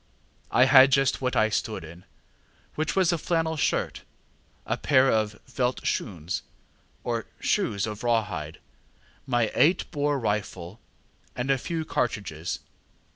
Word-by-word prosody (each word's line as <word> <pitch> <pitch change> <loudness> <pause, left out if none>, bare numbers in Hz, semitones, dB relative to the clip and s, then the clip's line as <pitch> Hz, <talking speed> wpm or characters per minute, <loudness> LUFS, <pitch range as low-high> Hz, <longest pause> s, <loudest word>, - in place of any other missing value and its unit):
I 125 - +5
had 135 0 +7
just 135 0 +2
what 125 -1 -1
I 110 - +3
stood 100 - -2
in, 85 +3 -12 0.7
which 155 - -2
was 185 -3 +3
a 170 - -1
flannel 165 0 0
shirt, 150 - -1 0.6
a - - 0
pair 135 -2 +3
of 105 -2 0
ŌĆśveldt 125 0 -1
schoons, 85 -9 -3
ŌĆÖ 85 - -2 0.6
or - - -2
shoes 100 -2 0
of 105 +1 -6
raw 115 -2 +3
hide, 75 -6 -6 0.7
my 120 -4 +1
eight 175 +4 +3
bore 145 0 0
rifle, 105 -4 -3 0.6
and 125 +2 -1
a 135 - +2
few 165 +2 -3
cartridges. 100 - -2
125 Hz, 140 wpm, -26 LUFS, 105-140 Hz, 0.7 s, had